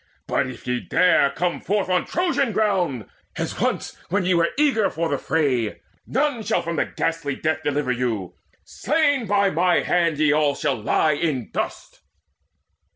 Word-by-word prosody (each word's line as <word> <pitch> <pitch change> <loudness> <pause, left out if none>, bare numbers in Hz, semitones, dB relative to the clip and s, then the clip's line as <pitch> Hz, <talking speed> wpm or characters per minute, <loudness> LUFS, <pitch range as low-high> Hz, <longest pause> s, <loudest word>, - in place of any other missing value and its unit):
But - - 0
if 130 -2 -10
ye 125 0 -1
dare 180 -3 +3
come 175 +5 -2
forth 205 -1 0
on 180 -1 +1
Trojan 330 -9 0
ground, 185 - 0 0.3
As - - -4
once - - -1
when 190 +1 0
ye 185 - +3
were 170 -1 +3
eager 275 -8 +3
for 165 0 -2
the 140 -2 -1
fray, 130 -10 0 0.3
None 270 -2 0
shall - - 0
from 170 -2 -2 0.2
ghastly 165 -4 -1
death 155 +1 -1
deliver 145 -2 0
you: 115 -7 -2 0.3
Slain 285 -4 0
by 200 0 +2
mine 175 +2 +2
hand 170 -3 +1
ye 155 -1 +3
all 150 -1 +2
shall 110 - -1
lie 155 +7 +2
in 145 -5 -2
dust!" - - -5
165 Hz, 160 wpm, -23 LUFS, 140-200 Hz, 0.3 s, dare